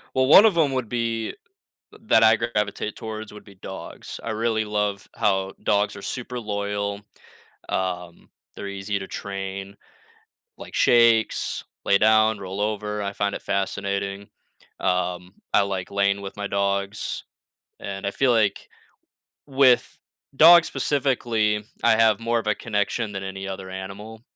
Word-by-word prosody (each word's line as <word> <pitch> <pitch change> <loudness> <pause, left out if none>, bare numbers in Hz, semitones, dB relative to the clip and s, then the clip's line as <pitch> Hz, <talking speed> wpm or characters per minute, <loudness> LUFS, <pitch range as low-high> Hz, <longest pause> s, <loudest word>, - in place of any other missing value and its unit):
Well, 130 0 +3
one 195 +9 +9
of 205 -6 +4
'em 145 -4 +3
would 125 -5 -2
be, 115 -2 -2 0.6
th - - -17
that 115 - +4
I 110 0 +6
gravitate 105 -2 -2
towards, 110 -1 -7
would 105 - -12
be 100 - -15
dogs. 95 +1 -9
I 115 - -4
really 110 0 0
love 105 -1 -2
how 95 -1 0
dogs 105 0 +1
are - - -9
super 125 -1 -5
loyal. 100 -1 -3 0.7
Um, 90 -2 -4 0.2
they're 100 - -6
easy 100 +1 -3
to 95 - -7
train, 100 0 -6 0.8
like, - - -11
shakes, 115 -2 +3 0.2
lay 100 - +5
down, 110 +1 +4
roll 95 +1 -5
over, 105 0 -2
I 100 - -2
find 100 0 -1
it - - -6
fascinating. 100 0 -2 0.5
Um, 90 0 -2
I - - +6
like 95 -2 -3
laying 100 0 +1
with 100 0 -8
my 100 0 -3
dogs. 100 +1 -2 0.6
And, 100 0 -5
I - - 0
feel 135 +3 +2
like 110 -4 +1 0.8
with 135 -3 +3 0.4
dogs, 170 +3 +8
specifically, 115 -7 0 0.2
I - - +6
have 110 -2 +4
more 115 +1 0
of 110 - -11
a 105 - +3
connection 105 0 -2
than 95 -1 -5
any 95 0 -6
other 95 -1 -6
animal 100 +4 -8
105 Hz, 150 wpm, -24 LUFS, 100-115 Hz, 0.8 s, one